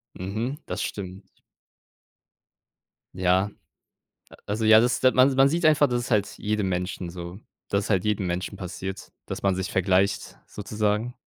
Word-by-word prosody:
Mhm, 110 +10 -4
das - - -4
stimmt. 95 -1 -7 1.8
Ja, 95 +2 +2 0.8
a - - -14
also, 105 +2 -2
ja, 110 0 +8
das 120 +2 +1
man 130 +1 +5
man 135 +1 +5
sieht 170 +3 -1
einfach, 150 -2 +5
das 120 -1 0
ist 125 - -7
halt 105 -2 +1
jedem 105 -2 -1
Menschen 90 -1 -3
so 85 +1 -8 0.3
dass 100 +1 0
es - - -6
halt 95 -3 +2
jedem 105 -3 0
Menschen 90 +3 -3
passiert, 95 0 -6 0.2
dass - - -6
man 95 -2 +2
sich 95 -1 -3
vergleicht 95 +1 +1
sozusagen. 105 +3 -2
100 Hz, 155 wpm, -25 LUFS, 95-115 Hz, 1.8 s, ja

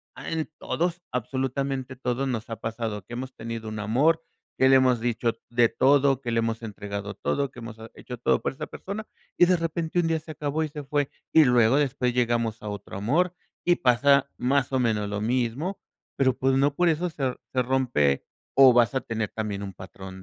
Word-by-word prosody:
ah, - - -7
en 160 -1 -2
todos, 175 +1 -1
absolutamente 130 +1 -2
todos 125 +1 -1
nos 115 -2 -3
ha 115 - -3
pasado 110 -2 -4
que 120 - -10
hemos 130 +2 -5
tenido 115 -1 -6
un 110 0 -5
amor, 140 +10 +2 0.3
que 130 - +5
le 135 - +7
hemos 130 -2 +3
dicho 115 -1 0 0.2
de 120 0 +4
todo, 135 -1 +3
que 120 -3 -3
le 115 - +2
hemos 115 0 -1
entregado 100 -1 -5
todo, 140 +6 -1
que 125 - -12
ha - - -9
hemos 115 -1 -8 0.2
hecho 125 - -8
todo 120 - +1
por - - -2
esa 150 +3 -6
persona 205 +3 -6 0.3
y 175 - +7
de 180 0 +3
repente 165 +1 -1
un 170 - +2
día 165 -1 +1
se 155 - -9
acabó 150 +1 -2
y 155 - -3
se 150 0 -7
fue, 145 0 0 0.2
y 160 - +8
luego 120 -1 +4
después 130 -4 +1
llegamos 115 -2 0
a 105 - -4
otro 100 -1 -7
amor, 165 - +1 0.3
y 175 - +5
pasa 140 +3 +4
más 135 +2 +1
o 130 - +3
menos 110 -4 0
lo 105 0 -3
mismo. 125 - -1 0.4
Pero 130 -2 +2
pues, 135 0 +2
no 140 +1 +2
por 175 +1 +3
eso 170 +2 0
se 135 -5 -2 0.2
se 130 - +2
rompe 120 - +1 0.3
o 135 -2 +8
vas 120 +1 +4
a 130 - +3
tener 110 -2 -3
también 105 -2 -4
un 95 -1 -6
patrón 95 0 -10
125 Hz, 210 wpm, -26 LUFS, 115-140 Hz, 0.4 s, y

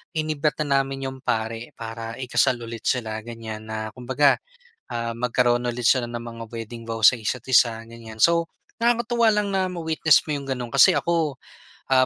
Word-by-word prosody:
inimbita 155 -1 0
namin 135 -1 0
'yong 130 - -11
pari 115 -2 -3
para 115 0 -6
ikasal 130 0 +1
ulit 115 0 -7
sila, 110 -3 -1
ganyan, 110 -1 -8
na 110 0 -4
kumbaga 130 +4 +2 0.5
ah, 115 -1 -3
magkaroon 120 0 +1
ulit 120 -1 +1
sila 130 -3 +3
ng 120 0 -6
mga 115 -1 -8
wedding 115 0 -7
vow 115 0 -4
sa 125 +4 +7
isa't 115 +2 -3
isa, 115 -3 +4
ganyan. 115 -1 -11
So, 170 0 +4 0.4
nakakatuwa 235 0 +2
lang 210 -2 +1
na 190 -1 +1
ma-witness 160 -3 +2
mo 155 - -4
'yong 140 - -9
gano'n 120 -2 -6
kasi 135 - +7
ako 165 -4 0 0.6
ah, 130 -1 +5
125 Hz, 170 wpm, -24 LUFS, 115-145 Hz, 0.6 s, sa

